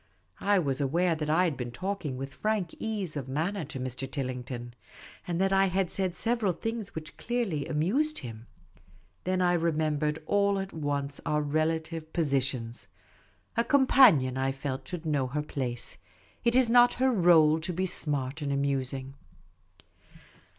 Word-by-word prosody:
I 205 0 +3
was 140 -5 0
aware 170 +6 +2
that 155 -1 -3
I 165 +4 +4
had 165 -5 +1
been 125 -2 -4
talking 175 -1 -3
with 135 +1 -6
frank 215 -6 -1
ease 205 -8 -3
of 135 -3 -4
manner 165 +7 -1
to 135 -2 -7
Mr. 130 +1 -4
Tillington, 125 -3 -5 0.5
and 175 -1 -1
that 195 0 +2
I 195 0 +5
had 185 -1 0
said 190 -2 -1
several 230 -5 0
things 225 +3 -5
which 155 -1 -7
clearly 225 -12 -2
amused 205 - +1
him. 115 -2 -8 0.8
Then 185 0 +1
I 175 0 +3
remembered 155 -3 0
all 200 +1 +2
at 195 0 -4
once 145 -2 -3
our 150 0 0
relative 160 +1 -1
positions. 135 -7 -1 0.7
A 235 - +3
companion, 255 - +5
I 135 0 0
felt, 135 -1 -5
should 175 -2 -6
know 145 -4 +1
her 150 +4 -2
place; 125 -5 -3 0.4
it 235 +1 +2
is 260 -1 +5
not 245 +1 +6
her 260 +1 +2
role 165 -6 +5
to 170 +3 -3
be 185 +2 -1
smart 145 -4 -2
and 145 -1 -2
amusing. 135 -1 -1
155 Hz, 155 wpm, -29 LUFS, 135-190 Hz, 0.8 s, not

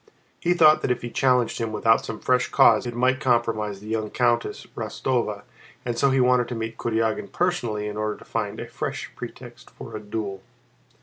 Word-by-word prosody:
He 175 +1 +1
thought 155 -2 +6
that - - -1
if 125 -1 -1
he 120 - -5
challenged 125 -2 +2
him 115 -1 -2
without 115 +1 +3
some 110 - -6
fresh 125 0 +2
cause 110 +2 +5
it 120 - -5
might 130 +2 +2
compromise 115 -6 0
the 105 - -11
young 110 -1 -2
Countess 120 0 0
Rostóva 115 -5 -2 0.4
and 120 -1 -1
so 140 +3 +3
he 135 0 +2
wanted 125 -1 +3
to 125 - -4
meet 115 0 -4
Kurágin 115 - -1
personally 120 -13 -1
in 105 0 -5
order 110 0 -2
to - - -15
find 105 -2 -3
a - - -4
fresh - - -5
pretext - - -10
for - - -10
a - - -4
duel. 105 -2 -5
115 Hz, 195 wpm, -24 LUFS, 110-125 Hz, 0.4 s, thought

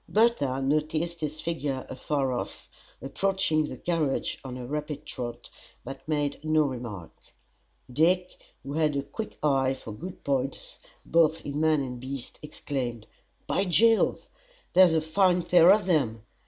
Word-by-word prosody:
Bertha 210 - +2
noticed 155 +4 0
his 155 0 -3
figure 145 -5 -3
afar 135 +1 -1
off, 120 - -5 0.4
approaching 155 +1 0
the - - -7
carriage 160 -6 -1
on 130 -1 -6
a 125 - -6
rapid 150 +2 -4
trot, 120 -1 -7 0.3
but 135 +4 -9
made 145 -2 -1
no 155 0 +3
remark. 120 - -5 0.8
Dick, 180 +6 +2 0.3
who 140 +1 -6
had 155 -1 +1
a 140 - -1
quick 220 +8 -7
eye 135 -2 +2
for 115 - -9
good 175 - -8
points 135 -1 -2 0.3
both 165 -1 +2
in 145 +1 -3
man 155 -2 +3
and 125 -2 -6
beast, 130 0 -7
exclaimed, 130 -6 -4 0.4
"By 195 - +1
Jove! 225 +5 +3 0.5
there's 180 -2 +6
a 160 - +3
fine 180 +2 +2
pair 175 +1 +6
of 205 -1 +4
them! 130 - +1
150 Hz, 145 wpm, -27 LUFS, 135-170 Hz, 0.8 s, there's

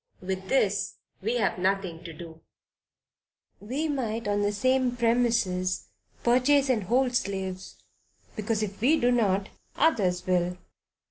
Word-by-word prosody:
With 190 0 -4
this 205 -7 +1 0.3
we 225 +5 -1
have 200 -5 0
nothing 185 -3 -1
to 170 - -6
do; 160 0 -11 1.2
we 265 +10 -2
might 230 -7 -2
on 205 0 +1
the 205 0 +1
same 255 +4 +1
premises, 230 -6 +1 0.3
purchase 265 +3 +4
and 225 -6 +1
hold 250 +3 +2
slaves, 190 -3 -3 0.6
because 215 0 -1
if 200 -1 -6
we 295 +7 +4
do 245 +1 +3
not, 200 -5 +1 0.3
others 200 - +2
will. 180 -1 +1
210 Hz, 130 wpm, -27 LUFS, 185-245 Hz, 1.2 s, purchase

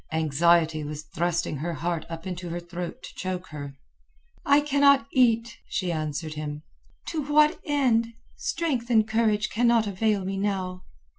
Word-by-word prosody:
Anxiety 160 +1 +2
was 150 +1 -6
thrusting 170 0 -1
her 170 +5 -3
heart 165 +1 -3
up 165 +1 -7
into 180 -1 -5
her 170 +1 -3
throat 175 0 -7
to - - -9
choke 185 -1 -4
her. 145 -2 -8 0.7
"I 285 +1 +5
cannot 280 -1 +4
eat," 230 -2 +2
she 185 -3 -1
answered 155 0 -3
him. 150 0 -5 0.5
"To 320 -2 -2
what 300 +1 +4
end? 235 -6 +1 0.2
Strength 330 - -2
and 220 -2 +4
courage 220 -1 +1
cannot 235 -1 +3
avail 205 0 0
me 195 +1 -3
now." 190 -2 -2
185 Hz, 150 wpm, -26 LUFS, 165-235 Hz, 0.7 s, I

